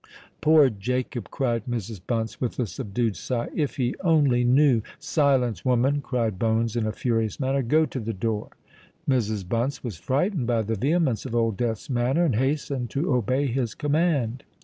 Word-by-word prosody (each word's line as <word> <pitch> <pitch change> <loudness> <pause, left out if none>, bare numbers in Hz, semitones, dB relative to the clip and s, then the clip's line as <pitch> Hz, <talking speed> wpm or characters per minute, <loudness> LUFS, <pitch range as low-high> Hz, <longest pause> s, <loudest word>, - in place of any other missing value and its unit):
"Poor 155 -2 +6
Jacob!" 120 +2 -3
cried 120 -5 -1
Mrs. 115 -5 -4
Bunce, 115 -2 -2
with 125 - -2
a 125 - +2
subdued 110 +1 -2
sigh: 120 +5 -3
"If 150 -4 -1
he 125 -2 0
only 145 -8 +3
knew——" 130 -1 +4 0.2
"Silence, 135 -6 +1
woman!" 130 +3 +2
cried 115 -8 -1
Bones 115 0 +1
in 115 -2 0
a - - 0
furious 115 -2 -1
manner. 135 0 +1
"Go 155 +6 +3
to 135 - -5
the 115 -1 -3
door." 110 +1 -2 0.6
Mrs. 110 -7 0
Bunce 120 +7 -1
was 115 -9 -5
frightened 140 - 0
by 115 -2 +1
the 110 +2 -2
vehemence 135 - +1
of 120 - -4
Old 115 -2 +1
Death's 110 0 -2
manner, 130 +6 +1
and 130 -10 +1
hastened 135 -1 -1
to 140 - 0
obey 125 +4 +1
his 125 -3 -1
command. 145 -5 0
125 Hz, 170 wpm, -25 LUFS, 115-140 Hz, 0.6 s, Poor